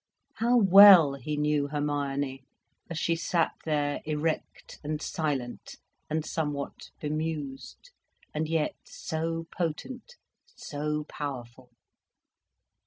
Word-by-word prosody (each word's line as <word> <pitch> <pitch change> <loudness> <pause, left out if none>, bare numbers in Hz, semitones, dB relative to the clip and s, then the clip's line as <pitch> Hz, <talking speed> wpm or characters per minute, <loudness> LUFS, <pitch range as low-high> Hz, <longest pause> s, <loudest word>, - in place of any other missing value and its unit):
How 240 +2 +3
well 195 -7 +9
he 140 +3 -4
knew 150 -1 +1
Hermione, 140 -2 -2 0.5
as 170 - -4
she 165 +1 +1
sat 165 0 +1
there, 145 -2 0
erect 155 +1 -3
and 150 +1 -2
silent 140 -7 -3 0.3
and 155 0 -1
somewhat 145 -3 -4
bemused, 155 - -4 0.4
and 155 +1 -2
yet 160 -2 0
so 165 0 -4
potent, 245 - -4 0.4
so 150 0 -3
powerful! 130 -4 -7
150 Hz, 100 wpm, -28 LUFS, 145-165 Hz, 0.5 s, well